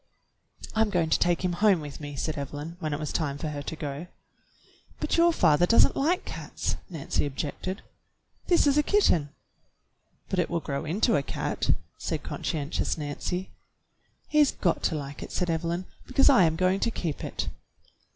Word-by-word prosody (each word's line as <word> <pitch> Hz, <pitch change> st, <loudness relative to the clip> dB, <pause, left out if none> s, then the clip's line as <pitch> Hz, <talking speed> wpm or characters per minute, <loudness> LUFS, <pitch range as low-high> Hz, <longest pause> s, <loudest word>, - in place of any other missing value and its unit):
"I'm 220 Hz, -1 st, +2 dB
going 170 Hz, -5 st, +1 dB
to -, -, +4 dB
take 175 Hz, +1 st, +2 dB
him 180 Hz, -, +1 dB
home 200 Hz, -1 st, +4 dB
with 145 Hz, -2 st, -8 dB
me," 145 Hz, -1 st, -6 dB
said 155 Hz, +3 st, -2 dB
Evelyn, 145 Hz, +3 st, -5 dB
when 155 Hz, -3 st, -2 dB
it 145 Hz, -, -1 dB
was 150 Hz, -1 st, -4 dB
time 145 Hz, -4 st, -1 dB
for 155 Hz, -, -3 dB
her 145 Hz, -1 st, -4 dB
to 150 Hz, -, -5 dB
go. 150 Hz, +2 st, -5 dB, 0.9 s
"But -, -, 0 dB
your 340 Hz, 0 st, +5 dB
father 175 Hz, -, +4 dB
does 230 Hz, -, +7 dB
n't -, -, -3 dB
like 340 Hz, +7 st, +1 dB
cats," -, -, -3 dB
Nancy 160 Hz, -6 st, -1 dB
objected. 150 Hz, +7 st, -4 dB, 0.6 s
"This 345 Hz, -3 st, +4 dB
is 285 Hz, 0 st, +4 dB
a -, -, +6 dB
kitten." 295 Hz, -, +3 dB, 1.0 s
"But 190 Hz, -, -1 dB
it 175 Hz, -, +1 dB
will 170 Hz, -, 0 dB
grow 140 Hz, -2 st, -4 dB
into 205 Hz, +8 st, +2 dB
a -, -, +1 dB
cat," -, -, -3 dB, 0.3 s
said -, -, -3 dB
conscientious 150 Hz, +1 st, -2 dB
Nancy. 160 Hz, +5 st, -4 dB, 0.8 s
"He's 300 Hz, -2 st, +4 dB
got 175 Hz, -3 st, 0 dB
to -, -, +1 dB
like 145 Hz, -1 st, -6 dB
it," -, -, -7 dB
said 175 Hz, -2 st, 0 dB
Evelyn, 170 Hz, +2 st, -1 dB, 0.2 s
"because 270 Hz, +2 st, +5 dB
I 195 Hz, -10 st, +6 dB
am 160 Hz, 0 st, +1 dB
going 185 Hz, +3 st, +2 dB
to 230 Hz, -, +1 dB
keep 165 Hz, -9 st, -3 dB
it." -, -, -3 dB
170 Hz, 180 wpm, -27 LUFS, 150-195 Hz, 1.0 s, does